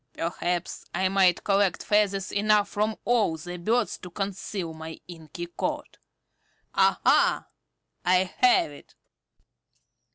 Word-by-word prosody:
Perhaps 175 +1 -3
I 190 0 +1
might 190 -2 +3
collect 195 -2 +1
feathers 200 -2 +1
enough 210 0 +3
from 215 +1 -1
all 220 -9 +2
the 175 +3 -7
birds 220 +6 0
to 180 - -9
conceal 195 -2 -4
my 160 0 -9
inky 170 0 -8
coat. 175 - -5 0.7
Aha! - - +3 0.6
I 180 +1 +3 0.2
have 250 -11 +4
it." 145 - -15
190 Hz, 110 wpm, -26 LUFS, 175-205 Hz, 0.7 s, have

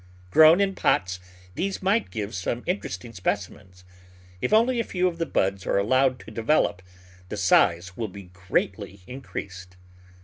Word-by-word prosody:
Grown 160 - +7
in 200 -1 +2
pots 90 - 0 0.3
these 195 - -3
might 205 +4 +1
give 105 -2 -5
some 105 +5 -3
interesting 175 - -4
specimens. 95 -1 -4 0.6
If - - -1
only 235 +3 +4
a - - +1
few 185 -3 0
of 170 -2 -4
the 165 - -1
buds 95 0 0
are - - +1
allowed 130 +5 +2
to - - -12
develop 115 -3 +1 0.5
the - - -5
size 90 +2 +3
will 115 0 -3
be 95 -2 -12
greatly 95 +2 -3
in 130 +6 -8
creased. 90 -6 -8
110 Hz, 160 wpm, -25 LUFS, -, 0.6 s, Grown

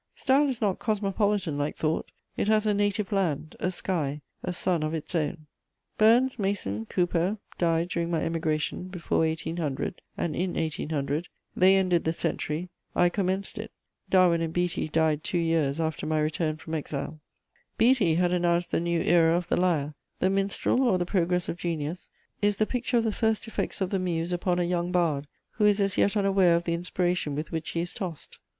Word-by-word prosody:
Style 280 +2 +3
is 250 -2 -4
not 200 -4 +1
cosmopolitan 200 -6 0
like 145 +1 -1
thought: 155 0 -1 0.2
it - - -1
has 215 0 +3
a 210 - +3
native 205 0 0
land, 165 -6 -1
a 185 - 0
sky, 160 -6 -2 0.2
a - - -3
sun 180 -1 0
of 155 +1 -1
its 160 - -6
own. 155 -1 -1 0.5
Burns, 240 +3 +4
Mason, 115 - -2
Cowper 180 +2 0 0.2
died 170 0 +1
during 170 -1 -1
my 165 -2 0
emigration, 160 +1 -1
before 180 -2 -2
1800 160 -1 -2 0.2
and 155 -3 -2
in 180 0 -1
1800: 155 0 -2 0.3
they 190 +1 +6
ended 180 -3 +2
the 160 - 0
century; 165 +1 -2 0.3
I 175 - +4
commenced 190 +2 -2
it. 220 +1 -6 0.4
Darwin 180 -3 +4
and 165 -1 -1
Beattie 175 -1 -1
died 155 -1 +1
two 180 - -1
years 165 -3 +1
after 160 -1 -2
my 155 0 +1
return 155 +1 0
from 160 0 -8
exile. 150 -2 -3
[Sidenote: - - -4
James 155 -2 -24
Beattie.] 240 -2 +4
Beattie 160 -2 +3
had 175 +1 +2
announced 175 -1 +1
the - - +2
new 170 0 0
era 165 0 +4
of 175 -1 -4
the - - +2
lyre. 155 -5 +1 0.2
The 185 - +2
Minstrel, 195 +6 +1
or 240 -8 +3
the 175 - -1
Progress 180 -1 +1
of 170 - -3
Genius 165 0 -3 0.3
is 205 0 +3
the 215 - +2
picture 245 +1 -1
of 230 - +3
the 220 - +1
first 220 +1 0
effects 225 - -3
of 185 - 0
the 195 - +1
muse 175 -1 -1
upon 175 0 0
a 180 - +2
young 175 0 -1
bard 160 -6 +1 0.2
who 210 - +1
is 205 0 +4
as 200 -1 +1
yet 200 +2 +2
unaware 195 -3 +4
of 170 - 0
the 170 - -1
inspiration 175 -3 -1
with 150 +1 -4
which 160 -1 -3
he 165 - -1
is 175 - -2
tossed. 180 -7 -6
175 Hz, 195 wpm, -27 LUFS, 160-195 Hz, 0.5 s, they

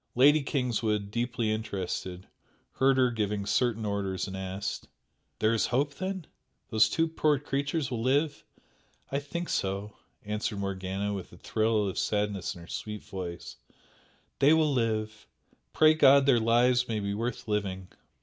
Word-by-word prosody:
Lady 145 +5 +6
Kingswood, 115 -7 -1
deeply 120 -1 -1
interested, 95 -4 -4 0.5
heard 135 0 +4
her 125 -1 +4
giving 105 -3 -2
certain 110 +1 +1
orders 100 -2 -2
and 95 - -6
asked 95 +1 -4 0.5
"There 110 +1 +2
is 115 - +1
hope 140 +4 0
then? 190 +1 -4 0.5
These 110 0 +5
two 165 +8 +1
poor 155 -2 +2
creatures 140 +1 -2
will 115 -2 -2
live?" 140 +4 +1 0.7
"I 140 - 0
think 170 +5 -5
so" 100 +2 -2 0.3
answered 105 0 -2
Morgana, 100 +1 -3
with 95 -3 -6
a 90 - -14
thrill 110 +1 +1
of 95 - -3
sadness 105 -3 -1
in 85 - -11
her 85 - -12
sweet 105 +2 -6
voice 90 -5 -7 0.8
"They 145 +3 +6
will 155 -2 +3
live 110 -3 -1 0.4
pray 155 0 +6
God 140 -3 +6
their 130 -4 +5
lives 120 +2 +3
may 110 -2 -1
be 100 0 -2
worth 115 +3 -3
living!" 95 -3 -2
110 Hz, 150 wpm, -29 LUFS, 100-135 Hz, 0.8 s, Lady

